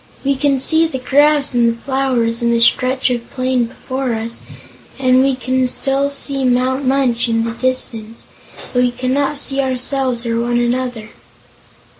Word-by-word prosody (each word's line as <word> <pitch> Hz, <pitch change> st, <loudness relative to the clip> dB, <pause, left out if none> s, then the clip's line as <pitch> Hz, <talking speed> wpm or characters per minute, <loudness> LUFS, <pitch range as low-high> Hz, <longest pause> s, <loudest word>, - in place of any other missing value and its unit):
We 275 Hz, 0 st, +1 dB
can 275 Hz, 0 st, +1 dB
see 320 Hz, +4 st, +3 dB
the 315 Hz, -, -4 dB
grass, 285 Hz, +2 st, +2 dB
and 240 Hz, -1 st, +3 dB
the 230 Hz, 0 st, -4 dB
flowers, 255 Hz, -3 st, -1 dB
and 235 Hz, 0 st, +1 dB
the 235 Hz, -, +2 dB
stretch 255 Hz, +2 st, +2 dB
of 240 Hz, -1 st, -4 dB
plain 255 Hz, -2 st, 0 dB
before 255 Hz, +1 st, -4 dB
us, 225 Hz, +1 st, -2 dB, 0.6 s
and 255 Hz, -1 st, +3 dB
we 270 Hz, 0 st, +2 dB
can 255 Hz, 0 st, 0 dB
still 275 Hz, +2 st, 0 dB
see 280 Hz, -1 st, -3 dB
Mount 255 Hz, +2 st, +1 dB
Munch 255 Hz, -3 st, +1 dB
in 225 Hz, 0 st, +1 dB
the 230 Hz, -, -2 dB
distance; 230 Hz, -2 st, -3 dB, 0.5 s
but 250 Hz, -, +2 dB
we 250 Hz, -, +3 dB
cannot 260 Hz, +4 st, -1 dB
see 275 Hz, -1 st, 0 dB
ourselves 255 Hz, -1 st, -1 dB
or 230 Hz, 0 st, -1 dB
one 240 Hz, 0 st, 0 dB
another." 240 Hz, -2 st, -2 dB
255 Hz, 165 wpm, -17 LUFS, 240-270 Hz, 0.6 s, see